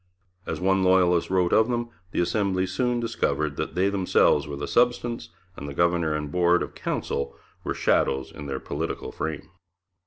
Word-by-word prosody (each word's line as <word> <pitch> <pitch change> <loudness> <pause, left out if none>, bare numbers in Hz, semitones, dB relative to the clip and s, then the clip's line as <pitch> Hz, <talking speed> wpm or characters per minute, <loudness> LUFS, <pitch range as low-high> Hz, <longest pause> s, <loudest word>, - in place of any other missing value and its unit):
As - - -3
one 95 +1 +2
Loyalist 90 -2 +3
wrote 90 -2 +2
of 110 +1 +5
them, 120 -1 -1 0.2
the 90 - 0
Assembly 95 +1 +1
soon 120 +6 0
discovered 75 -10 -1
'that - - -4
themselves 95 -4 +3
were 70 - -5
the 70 - -4
substance, 120 -2 +1 0.3
and 70 -2 -7
the 70 - -8
Governor 85 -2 +2
and 75 -1 -4
Board 90 0 +3
of - - -8
Council 70 0 -3 0.3
were - - -2
shadows 65 0 +1
in 75 - -8
their 65 -1 -3
political - - -4
frame.' 80 +4 -5
90 Hz, 165 wpm, -25 LUFS, 75-100 Hz, 0.3 s, of